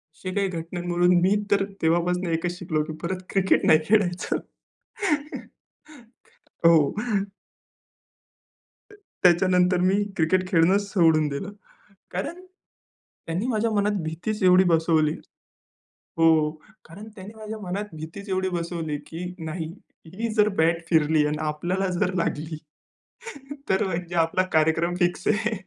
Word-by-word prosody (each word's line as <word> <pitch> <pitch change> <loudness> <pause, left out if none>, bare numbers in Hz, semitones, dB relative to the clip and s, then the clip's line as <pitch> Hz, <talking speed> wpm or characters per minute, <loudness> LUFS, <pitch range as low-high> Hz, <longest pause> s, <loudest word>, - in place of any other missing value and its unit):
अशी 185 +3 -6
काही 200 -1 +1
घटनांवरून 175 +1 0
मी 195 +3 +3 0.2
तर 200 -1 +3 0.2
तेव्हापासून 175 +2 +1
एकच 175 +2 -2
शिकलो, 155 -4 -1
की 155 - -7
परत 185 +1 -3
क्रिकेट 190 -1 +2
नाही 155 - +6
खेळायचं. 185 -4 +1 2.3
हो. 160 -4 +5 2.0
अ, - - -15 0.3
त्याच्यानंतर 180 0 +4
मी 195 +3 +2
क्रिकेट 185 +3 +2
खेळणंच 190 +4 +3
सोडून 160 -5 +4
दिलं. 195 +9 -5 0.6
कारण 265 - -4 0.9
त्यांनी 175 +8 -2
माझ्या 225 -2 0
मनात 205 -2 0
भीतीच 170 +7 -4
एवढी 185 0 +6
बसवली 160 -2 +2 1.0
हो, 165 - +4 0.6
कारण 200 +7 -11
त्याने 200 +2 -10
माझ्या 220 0 -7
मनात 195 +2 -4
भीतीच 165 +6 -8
एवढी 190 0 0
बसवली, 170 -3 -3
की 165 +5 -7
नाही 160 0 -4 0.5
ही 230 +4 -3
जर 210 -1 +4
बॅट 165 +1 +2
फिरली 155 -2 +3
आणि 150 0 -2
आपल्याला 175 +5 -1
जर 185 -3 +1
लागली, 155 -2 -2 1.1
तर 190 - +2
म्हणजे 175 -1 -4
आपला 165 +3 +2
कार्यक्रम 165 +3 +2
फिक्स 175 0 0
आहे. 215 +1 +1
180 Hz, 120 wpm, -24 LUFS, 165-195 Hz, 2.3 s, नाही